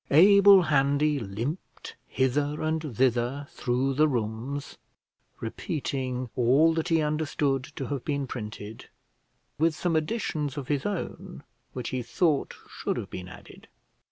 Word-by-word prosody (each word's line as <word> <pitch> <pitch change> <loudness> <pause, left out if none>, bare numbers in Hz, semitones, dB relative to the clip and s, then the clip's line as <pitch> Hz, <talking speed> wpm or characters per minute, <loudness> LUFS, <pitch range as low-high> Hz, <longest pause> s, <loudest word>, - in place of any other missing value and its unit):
Abel 195 +4 +8
Handy 145 0 +2
limped 115 - -6
hither 145 +3 0
and 155 -6 -2
thither 130 +2 +1
through 130 +2 0
the 155 +3 +4
rooms, 120 +2 -3 0.6
repeating 130 0 -3
all 135 +7 +4
that 160 -1 -1
he 165 -2 +2
understood 150 -3 0
to 135 - -4
have 140 -4 -3
been 140 -2 -1
printed, 110 -3 -7 0.7
with 160 0 +3
some 175 -1 -1
additions 155 - -1
of 135 -3 -5
his 145 +4 0
own 190 -4 -5 0.3
which 125 -2 -4
he 130 - -2
thought 150 +4 0
should - - -3
have - - -5
been 90 0 -6
added. 95 - -13
140 Hz, 130 wpm, -27 LUFS, 125-155 Hz, 0.7 s, Abel